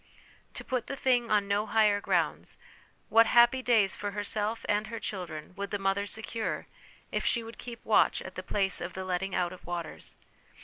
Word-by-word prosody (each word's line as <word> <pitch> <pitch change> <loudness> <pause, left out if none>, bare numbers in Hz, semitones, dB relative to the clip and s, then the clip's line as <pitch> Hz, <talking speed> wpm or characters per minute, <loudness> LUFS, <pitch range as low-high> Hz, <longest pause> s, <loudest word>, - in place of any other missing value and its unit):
To - - -4
put 255 -3 -2
the 275 - -3
thing 245 -3 +2
on 205 -2 +2
no 205 +2 0
higher 210 -2 +3
grounds, - - 0 0.5
what 225 +1 +6
happy 240 +2 +5
days 220 -6 +3
for 205 -1 -4
herself 210 +2 -1
and 210 +1 +1
her 230 0 -5
children 175 -5 -6
would 200 0 -4
the 205 - -1
mother 195 +1 0
secure 220 +2 -3 0.5
if - - -1
she 235 - +1
would 225 0 -11
keep 235 -2 -9
watch - - +4
at - - -8
the - - -5
place 195 -2 -1
of 175 0 -5
the 190 0 -5
letting 185 +1 -2
out 175 0 0
of 185 - -13
waters! 175 -2 -6
205 Hz, 190 wpm, -29 LUFS, 195-230 Hz, 0.5 s, what